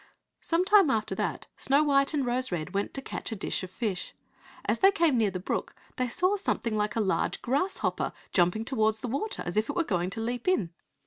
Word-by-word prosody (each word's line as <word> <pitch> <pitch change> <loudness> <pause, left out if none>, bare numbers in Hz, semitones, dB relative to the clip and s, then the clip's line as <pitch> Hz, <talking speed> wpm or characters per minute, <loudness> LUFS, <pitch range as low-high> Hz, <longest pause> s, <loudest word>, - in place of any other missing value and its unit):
Some 340 +2 +1
time 400 -5 +6
after 215 -4 0
that - - -2
Snow 280 +3 +3
white 275 -2 +3
and 280 -3 +1
Rose 250 0 0
red 165 -1 -3
went 200 +1 -1
to 270 - -3
catch - - -5
a - - -2
dish 195 - -2
of 185 - -6
fish. 195 -1 -3 0.5
As - - +1
they 390 - +7
came 335 -8 +3
near 220 -4 +3
the 185 -1 -4
brook 180 - -3 0.2
they 255 -1 0
saw 365 - +2
something 235 - -1
like 210 0 0
a - - +1
large 195 -3 0
grasshopper 285 +10 0 0.2
jumping 180 +5 +2
towards 220 -4 +1
the - - -3
water, 280 - -3
as 175 +3 -4
if 215 +1 +1
it - - -2
were 350 - +2
going 180 - -1
to 200 - -6
leap 240 +4 -3
in. 210 - +2
240 Hz, 220 wpm, -28 LUFS, 205-290 Hz, 0.5 s, they